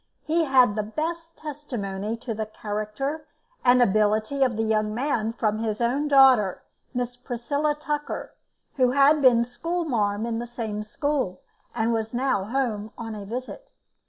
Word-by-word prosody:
He 325 +1 +1
had 255 -6 +5
the 215 - +1
best 330 +9 -4
testimony 230 -9 -4
to 235 0 -5
the 215 0 -3
character 215 +9 -4 0.4
and 245 0 +6
ability 215 +5 +2
of 245 -4 +1
the 225 - +1
young 215 -1 0
man 235 -4 0
from 215 -2 -1
his 220 -2 -2
own 255 +5 +1
daughter, 260 -9 +5 0.3
Miss 245 -1 -3
Priscilla 275 +5 -1
Tucker, 295 -1 -4 0.4
who 255 -2 +4
had 285 +2 +5
been 240 -3 +5
school 335 +8 -3
marm 210 -6 0
in 230 -1 -2
the 240 - -5
same 225 -3 -4
school, 215 -3 -2 0.3
and 230 0 +1
was 225 +1 -2
now 245 -6 +1
home 220 -3 -1
on 225 -2 -5
a 205 -2 -7
visit. 255 - -6
240 Hz, 160 wpm, -25 LUFS, 215-280 Hz, 0.4 s, and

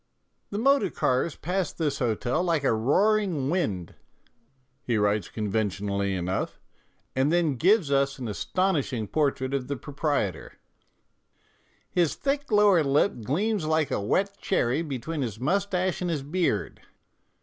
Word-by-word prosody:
"The 200 - -4
motor 275 +5 +3
cars 130 +5 0
pass 180 +2 -2
this 155 -4 -2
hotel 120 +5 0
like 165 -5 +1
a 135 - +3
roaring 160 - +2
wind," 100 - -1 0.9
he 120 -3 0
writes 105 -2 +1
conventionally 100 -2 -1
enough, 90 +1 -2 0.6
and 135 +3 +2
then 170 -4 +2
gives 175 - +3
us 140 0 +2
an 125 -3 -5
astonishing 125 - -1
portrait 140 0 0
of 135 -2 -1
the 140 - -2
proprietor: 145 - -2 0.7
" - - -39
His 170 -4 +1
thick 280 -1 -2
lower 205 -5 +5
lip 140 - +1
gleams 190 - 0
like 155 -2 +1
a - - 0
wet 195 - 0
cherry 135 -5 +1
between 150 +1 -4
his 110 -5 -4
moustache 185 +4 0
and 180 - -1
his 150 -5 -2
beard." 145 - -1
145 Hz, 140 wpm, -26 LUFS, 115-180 Hz, 0.9 s, lower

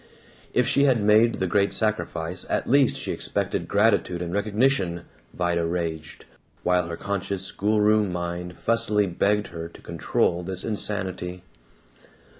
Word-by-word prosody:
If - - +2
she 140 - +3
had 130 -4 +3
made 110 +3 +4
the 95 - -1
great 100 +2 +2
sacrifice, 90 -5 -1
at - - -1
least 135 0 +4
she - - -3
expected - - -2
gratitude 100 -4 +2
and 85 0 -5
recognition, 105 -4 +1 0.3
Vida 85 -1 0
raged, 80 -2 -4 0.4
while 90 -1 +2
her 85 -1 -5
conscious 100 -1 -2
schoolroom 105 0 +2
mind 90 0 -4
fussily 115 -3 +1
begged 100 +3 0
her 85 -1 -7
to - - -16
control 85 +1 0
this 90 +1 -4
insanity. 95 -4 -3
95 Hz, 135 wpm, -25 LUFS, 85-105 Hz, 0.4 s, made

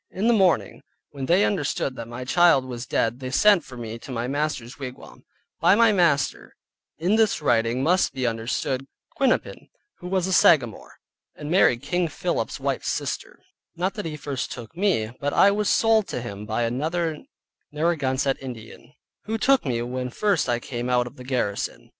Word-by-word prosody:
In 195 +4 -3
the 240 - +5
morning, 190 -6 +2 0.3
when 135 -2 -6
they 185 +4 +4
understood 145 -7 -1
that 115 - -7
my 120 +2 -7
child 170 -2 +4
was 125 -1 -6
dead 115 +2 0
they 130 -1 -5
sent 195 +6 +4
for 130 -3 -11
me 115 -2 -6
home 115 - -7
to 135 - -10
my 120 0 -2
master's 140 -3 -3
wigwam 130 -2 -9 0.3
(by 190 - +5
my 230 0 +5
master 170 -8 +1 0.4
in 180 +7 +1
this 220 -2 +2
writing, 120 -3 +1
must 180 +5 +2
be 130 -2 -3
understood 120 +3 -2 0.3
Quinnapin, 270 -3 0 0.3
who 180 - -8
was 185 -1 0
a 190 - -1
Sagamore, 135 - +3 0.4
and 150 +1 -7
married 135 -9 +3
King 175 +3 0
Philip's 155 - -3
wife's - - -2
sister; - - -4 0.3
not 185 +3 -1
that 210 - -6
he 155 -1 -5
first 140 -2 -4
took 120 +5 -9
me, 170 - 0
but 145 0 -2
I 200 - +6
was 210 0 0
sold 225 -2 +3
to 125 - -4
him 105 -2 -7
by 110 +2 -1
another 155 +7 -1 0.5
Narragansett 140 -4 0
Indian, 125 +1 -10 0.3
who 220 +1 -2
took 265 +1 +3
me 120 -2 -1
when 125 +1 -4
first 195 0 0
I 120 - +2
came 120 0 -5
out 125 -1 +2
of 120 - -10
the 125 - -11
garrison). 125 -6 -3
140 Hz, 185 wpm, -24 LUFS, 125-180 Hz, 0.5 s, I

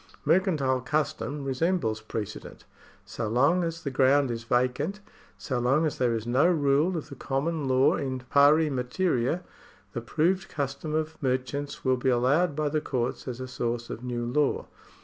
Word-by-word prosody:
Mercantile 150 -9 +2
custom 145 +1 -2
resembles 135 -5 0
precedent. 105 -3 -6 0.4
So 110 - -4
long 140 +11 +3
as 165 0 -4
the 140 - -3
ground 135 0 +3
is 115 0 -5
vacant 130 - 0 0.2
— - - -28
so 130 -5 0
long 135 +6 +2
as 150 - -2
there 120 -2 +2
is 110 -1 -4
no 130 +7 +3
rule 155 +1 +2
of 160 - -6
the 140 - -8
common 140 +3 -2
law 130 +1 +4
in 130 -2 -3
pari 145 +4 +4
materia 130 +4 0 0.2
— - - -29
the 120 - -3
proved 170 +10 0
custom 150 +2 -3
of 155 0 -3
merchants 130 +2 -2
will 130 0 +3
be 130 +1 0
allowed 140 +7 +2
by 155 0 0
the 155 +1 0
courts 125 -2 -3
as 125 -1 -5
a 130 - -5
source 120 -2 -3
of 120 - -7
new 120 -1 -3
law. 140 +4 0
135 Hz, 175 wpm, -27 LUFS, 125-155 Hz, 0.4 s, law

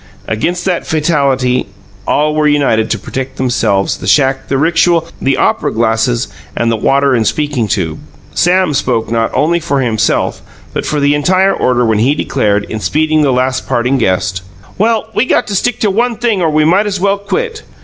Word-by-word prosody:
Against 175 +12 -2
that 180 -3 -1
fatality, 140 -5 +1 0.4
all 150 +1 +1
were 155 0 +2
united 140 -7 +2
to 115 - 0
protect 130 +5 -6
themselves, 120 -6 0
the - - -6
shack, 135 -2 +2
the 135 - -1
rixual, 165 +3 +2
the 135 0 +1
opera - - +1
glasses 115 +2 0 0.3
and 115 0 +1
the - - +1
water 140 +5 +2
and 115 -4 +1
speaking 145 -4 -1
tube. 80 -6 -2 0.3
Sam 180 -2 +2
spoke 120 -5 -1
not 115 -1 +1
only 170 +3 +2
for 155 -4 -1
himself 115 -5 0 0.3
but - - -3
for 150 - -1
the 145 0 +2
entire 185 +7 +2
order 125 -1 +1
when 110 -2 +1
he 130 +6 +2
declared, 105 -7 0
in 110 - -6
speeding 155 +6 +1
the 145 -2 +2
last 130 +1 -1
parting 125 +3 0
guest: 95 -2 0 0.4
"Well, 220 +1 +1
we - - +2
got - - +1
to 200 - -2
stick 245 +4 0
to 210 -4 +2
one 235 +4 0
thing 220 -4 0
or 165 - +2
we 155 0 +2
might 190 +6 +3
as 200 -2 -2
well 200 +1 +1
quit! 445 - -3
140 Hz, 190 wpm, -13 LUFS, 120-175 Hz, 0.4 s, might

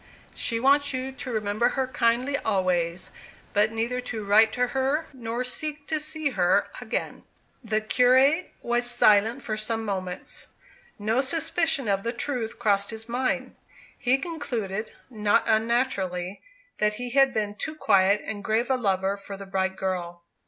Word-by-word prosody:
She 230 -1 0
wants 280 +2 +3
you 260 +1 -3
to 265 -1 -7
remember 215 +2 +1
her 265 - +2
kindly 250 +2 +1
always, 180 -4 0 0.4
but 210 +2 +3
neither 235 +3 -2
to 225 -4 -5
write 215 +2 +5
to 250 0 +1
her, 270 +5 0
nor 240 -1 -3
seek 295 +3 -4
to 315 -1 +1
see 310 -1 -1
her 180 -6 +2
again." - - -4 0.4
The 215 -1 0
curate 260 +9 +3
was 240 0 +1
silent 230 +1 +4
for 215 - -2
some 225 +1 -3
moments. 185 -3 -4 0.5
No 220 +5 +1
suspicion 320 -1 0
of 195 -1 +1
the 235 +3 -2
truth 240 -2 -3
crossed 200 -3 +1
his 225 0 -7
mind. 250 +2 -1 0.4
He 260 0 +2
concluded, 235 - -4 0.2
not 210 -3 +2
unnaturally, 215 -5 0 0.4
that 210 0 +2
he 245 +2 -5
had 270 +1 +5
been 210 -3 -1
too 310 +9 -5
quiet 200 -6 +3
and 205 -2 -5
grave 225 +4 +1
a 260 - +3
lover 195 -4 0
for 195 0 -8
the 195 - -8
bright 190 -1 -1
girl. 175 -3 -4
225 Hz, 155 wpm, -26 LUFS, 205-260 Hz, 0.5 s, write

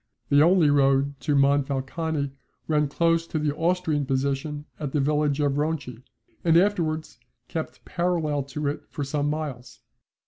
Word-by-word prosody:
The 145 0 +5
only 165 -2 +5
road 140 0 +2
to 150 -2 0
Monfalcone 140 +2 +1 0.4
ran 150 -1 +2
close 165 +3 +1
to 160 - -3
the 150 -1 0
Austrian 165 -3 0
position 140 +2 -1
at 145 -3 -4
the 150 - +2
village 150 0 +1
of 145 -1 +1
Ronchi, 145 -6 -3 0.4
and 165 -1 +5
afterwards 165 - 0 0.3
kept 160 -1 -6
parallel 170 -5 0
to 145 +2 -5
it 145 - -4
for 145 - -4
some 145 +1 -1
miles. 150 -5 -5
150 Hz, 145 wpm, -25 LUFS, 140-160 Hz, 0.4 s, The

